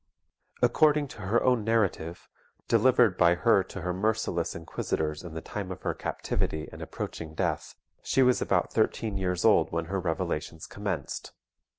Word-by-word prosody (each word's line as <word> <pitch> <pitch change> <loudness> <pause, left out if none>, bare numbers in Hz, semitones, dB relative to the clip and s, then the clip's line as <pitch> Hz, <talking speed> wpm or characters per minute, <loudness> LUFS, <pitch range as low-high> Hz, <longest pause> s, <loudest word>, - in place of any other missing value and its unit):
According 150 +3 +4
to 110 - -10
her 105 +5 +1
own 125 -4 +3
narrative, 100 -7 0 0.4
delivered 120 -7 +4
by 85 0 +5
her 100 +1 +4
to 95 - -8
her 90 +1 -2
merciless 95 -3 -1
inquisitors 80 -1 -3
in 85 -3 -8
the 80 - -4
time 100 -3 -5
of 90 - -8
her - - 0
captivity 80 0 -3
and - - -10
approaching 80 -1 -6
death, - - -2 0.3
she 135 - +2
was 125 -1 +3
about - - +1
thirteen 110 -3 0
years 90 -2 -1
old - - +5
when 85 0 -1
her 95 - +1
revelations 80 -2 -3
commenced. 100 -3 -4
95 Hz, 160 wpm, -28 LUFS, 85-115 Hz, 0.4 s, by